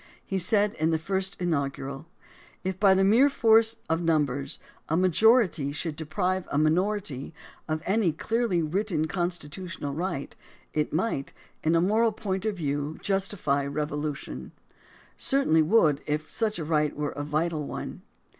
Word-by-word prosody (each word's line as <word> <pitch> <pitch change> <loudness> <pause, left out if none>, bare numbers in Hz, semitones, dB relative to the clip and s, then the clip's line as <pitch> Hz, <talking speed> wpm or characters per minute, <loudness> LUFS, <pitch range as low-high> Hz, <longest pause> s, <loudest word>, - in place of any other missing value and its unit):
He 195 - -1
said 205 +3 +3
in 160 +1 +2
the 160 - +2
first 190 +4 -2
inaugural: 140 -3 -2 0.6
If 190 0 -3
by 195 -2 +6
the 190 - +3
mere 230 +9 +5
force 225 -3 +4
of 165 +1 0
numbers 145 -5 0 0.3
a 160 - +2
majority 185 - +4
should 155 +1 -3
deprive 180 +4 -1
a - - 0
minority 160 -2 0 0.3
of 155 0 -2
any 195 -3 +2
clearly 210 +1 0
written 170 0 0
constitutional 175 -3 -4
right, 165 -2 -3 0.4
it 150 -1 0
might, 160 -4 -1 0.3
in 160 +1 +3
a 165 - +4
moral 220 +4 +3
point 195 -2 -3
of 215 -3 -1
view, 145 -1 -2
justify 195 -8 0
revolution 150 0 -4 0.3
— - - -24 0.2
certainly 265 - +3
would 155 -5 +3
if 150 +1 -2
such 220 -2 -1
a 160 - -4
right 150 -2 +1
were 150 0 -2
a 145 - -5
vital 155 0 -1
one. - - -6
165 Hz, 150 wpm, -27 LUFS, 150-195 Hz, 0.6 s, by